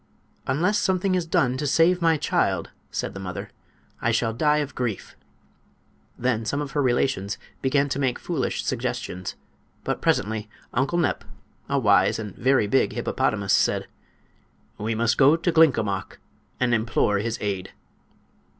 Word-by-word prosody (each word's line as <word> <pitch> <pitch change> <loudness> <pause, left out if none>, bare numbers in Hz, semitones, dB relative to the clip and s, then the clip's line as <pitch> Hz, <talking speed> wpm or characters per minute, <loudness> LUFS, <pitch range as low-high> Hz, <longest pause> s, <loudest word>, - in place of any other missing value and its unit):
"Unless 185 +9 +2
something 190 -1 +1
is 180 -2 0
done 130 -5 +2
to 145 +2 -2
save 170 +5 +3
my 165 -1 +3
child," - - 0 0.2
said - - -3
the 95 - -7
mother, 90 -2 -6 0.5
"I 120 - +1
shall 115 0 +1
die 150 +5 +2
of 145 -2 -2
grief." 120 -6 -4 1.0
Then 120 -2 0
some 140 +6 -2
of 145 -2 -4
her 145 - 0
relations 120 -6 0 0.2
began 140 +1 +2
to 135 - -2
make 130 -3 0
foolish - - -2
suggestions; 90 0 -3 0.5
but - - -2
presently 110 +1 0 0.2
Uncle 135 +7 +1
Nep, 160 -5 0 0.5
a 140 - +1
wise 100 -6 +4
and 105 -4 -6
very 130 -3 +3
big 120 +6 +2
hippopotamus, 100 -3 0
said: - - +2 0.9
"We 110 +2 -1
must 115 0 +1
go 140 +3 +7
to 170 +2 0
Glinkomok 115 - +2 0.4
and 125 -1 +2
implore 110 -3 +1
his 115 +2 -2
aid." 95 -3 -3
125 Hz, 150 wpm, -24 LUFS, 110-145 Hz, 1.0 s, go